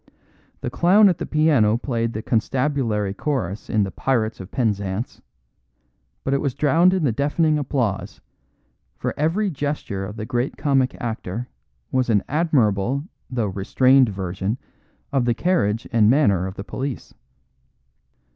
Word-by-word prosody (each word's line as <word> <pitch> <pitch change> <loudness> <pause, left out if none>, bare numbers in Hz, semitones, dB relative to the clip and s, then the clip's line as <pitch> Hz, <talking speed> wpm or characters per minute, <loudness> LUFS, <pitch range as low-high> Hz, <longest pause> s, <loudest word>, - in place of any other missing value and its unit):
The 125 - -3
clown 195 - +5
at 175 - -1
the - - -4
piano 145 -9 +3
played 115 -2 -2
the 110 - -5
constabulary 120 -4 0
chorus 110 - -3
in 105 -1 +2
the 95 - -3
"Pirates 115 +2 -1
of 95 -1 -8
Penzance," 105 -3 -2 1.0
but 135 - -1
it 140 - +1
was 140 -4 -1
drowned 160 +5 +4
in 185 -3 0
the 135 - +2
deafening 150 +5 +1
applause, 125 -8 -2 0.8
for - - -2
every 185 +7 0
gesture 145 - -3
of 105 +2 -6
the 110 -1 -5
great 120 +2 -2
comic 135 -3 +1
actor 115 0 -4 0.4
was 130 -1 +1
an 105 -3 +3
admirable 135 - +1 0.3
though 120 -4 -1
restrained 125 +7 +3
version 95 +2 -3 0.6
of 135 -3 +2
the 120 -1 +2
carriage 120 - 0
and 110 -2 +5
manner 100 - +3
of 95 - -7
the 100 - -6
police. 135 +4 -5
125 Hz, 145 wpm, -22 LUFS, 105-145 Hz, 1.0 s, clown